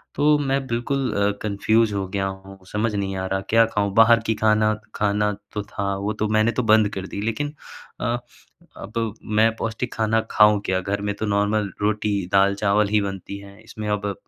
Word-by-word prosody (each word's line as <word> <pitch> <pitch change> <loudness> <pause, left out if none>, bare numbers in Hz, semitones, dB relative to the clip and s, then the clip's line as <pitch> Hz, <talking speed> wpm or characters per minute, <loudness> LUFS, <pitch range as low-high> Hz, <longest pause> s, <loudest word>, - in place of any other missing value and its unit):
तो 150 +1 +4
मैं 135 -1 0
बिल्कुल 125 +2 -1
अ, 100 0 +2
कन्फ्यूज़ 110 +1 +2
हो 95 -1 -2
गया 95 0 -1
हूँ, 95 0 -9
समझ 105 +1 0
नहीं 95 -1 -2
आ 95 - -3
रहा, 95 0 -1
क्या 115 0 +5
खाऊँ? 100 -3 -1
बाहर 115 +1 +6
की 110 - +1
खाना 110 0 +3 0.2
खाना 105 0 +1 0.2
तो 105 - -3
था, 100 -1 -3
वो 100 +2 -2
तो 110 +1 -1
मैंने 110 +2 +3
तो - - +1
बंद 110 -1 +4
कर 95 0 -5
दी, 100 - -5
लेकिन 145 +7 -2 0.5
अ, 120 0 0 0.6
अब 110 +1 -3 0.3
मैं 110 0 +4
पौष्टिक 115 +2 -3
खाना 110 0 +1
खाऊँ 105 -1 +5
क्या? 95 0 +1
घर 100 +2 -2
में 105 0 -1
तो 110 - -3
नॉर्मल 105 0 +1
रोटी, 105 -2 0
दाल-चावल 100 +1 +3
ही 105 0 +2
बनती 100 0 -5
है, 100 +1 -14
इसमें 110 -1 -7
अब 100 -1 -1
105 Hz, 195 wpm, -23 LUFS, 100-110 Hz, 0.6 s, बाहर